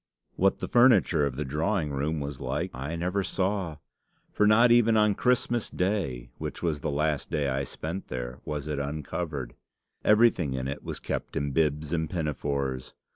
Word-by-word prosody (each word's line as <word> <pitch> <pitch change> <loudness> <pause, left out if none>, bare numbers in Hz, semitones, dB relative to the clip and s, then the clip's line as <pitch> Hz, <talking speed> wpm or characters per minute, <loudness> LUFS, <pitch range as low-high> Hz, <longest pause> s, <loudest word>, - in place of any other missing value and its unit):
What 95 +1 +3
the - - -4
furniture 105 - +5
of 65 - -5
the 75 +3 -3
drawing 80 +3 0
room 75 +3 -1
was 70 -1 -5
like, - - -2
I 70 +6 -4
never 90 +4 -1
saw; 95 -3 -1 0.6
for 105 - +3
not 115 +3 +6
even 115 -2 +5
on 105 -1 +4
Christmas 120 0 +1
Day, 90 - -2
which - - -5
was 80 -4 0
the - - -1
last 75 0 0
day 75 -4 0
I 70 +1 0
spent 85 +8 -6
there, 60 0 -5
was 75 -1 -4
it 75 -2 -2
uncovered. 70 -2 -4 0.5
Everything 105 - +4
in 65 0 -2
it 70 +1 -4
was - - -5
kept - - -4
in 70 0 -1
bibs 75 +1 0
and 80 -2 0
pinafores. 70 -5 -2
75 Hz, 175 wpm, -28 LUFS, 70-95 Hz, 0.6 s, not